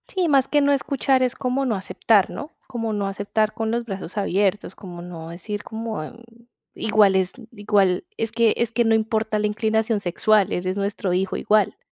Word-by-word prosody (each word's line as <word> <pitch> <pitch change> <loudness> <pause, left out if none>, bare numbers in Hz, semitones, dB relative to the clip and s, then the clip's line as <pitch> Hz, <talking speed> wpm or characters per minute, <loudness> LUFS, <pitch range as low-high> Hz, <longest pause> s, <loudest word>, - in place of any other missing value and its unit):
Sí, 375 -7 0
más 275 -3 +3
que 295 - +2
no 285 0 +3
escuchar, 270 -1 +1
es 255 0 0
como 255 +2 -1
no 235 -4 0
aceptar, 195 +2 +2
¿no? 295 +3 -7 0.2
Como 230 -4 -3
no 200 -1 -1
aceptar 205 +2 -1
con 225 -1 -2
los 235 0 -1
brazos 195 -3 -6
abiertos, 200 0 0
como 175 -3 -9
no 170 -2 -8
decir: 205 +5 -6
"Como, 220 -4 -5
mm, 230 +9 -11 0.5
igual 210 -3 +3
es 190 -1 +1 0.2
igual 205 -4 +1
es 225 -1 -2
que 230 -1 +3
es 235 -1 0
que 235 +1 +2
no 225 0 +4
importa 220 -1 0
la 210 - +1
inclinación 220 0 0
sexual, 200 +2 +2
eres 185 +1 -2
nuestro 200 -2 -2
hijo 185 +1 0
igual". 210 -2 +2
215 Hz, 190 wpm, -23 LUFS, 195-230 Hz, 0.5 s, no